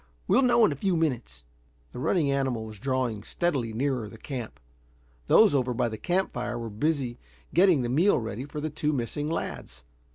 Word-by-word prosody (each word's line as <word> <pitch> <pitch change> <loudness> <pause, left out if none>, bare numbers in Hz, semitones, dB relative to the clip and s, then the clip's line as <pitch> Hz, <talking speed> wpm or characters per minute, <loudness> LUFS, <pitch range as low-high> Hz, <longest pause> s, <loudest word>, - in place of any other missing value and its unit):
We'll - - +4
know 240 -3 +5
in 205 - +2
a - - -2
few 180 +4 0
minutes." 125 - -2 0.5
The - - -8
running 145 +1 +1
animal 130 -5 -1
was 110 -2 -10
drawing 130 -4 -1
steadily 135 -1 -1
nearer 125 -2 -1
the 115 - -12
camp. 125 -2 -6 0.7
Those 220 -6 +6
over 125 -3 +1
by 120 0 +1
the 110 - -6
camp 185 +2 0
fire 120 -1 -3
were 115 -2 -5
busy 130 +1 -1 0.3
getting 175 -6 +5
the - - -1
meal 165 +12 +3
ready 115 +2 -4
for 150 +1 -7
the 155 +1 -3
two 150 0 -1
missing 145 +4 -2
lads. 65 - -5
130 Hz, 190 wpm, -27 LUFS, 115-155 Hz, 0.7 s, Those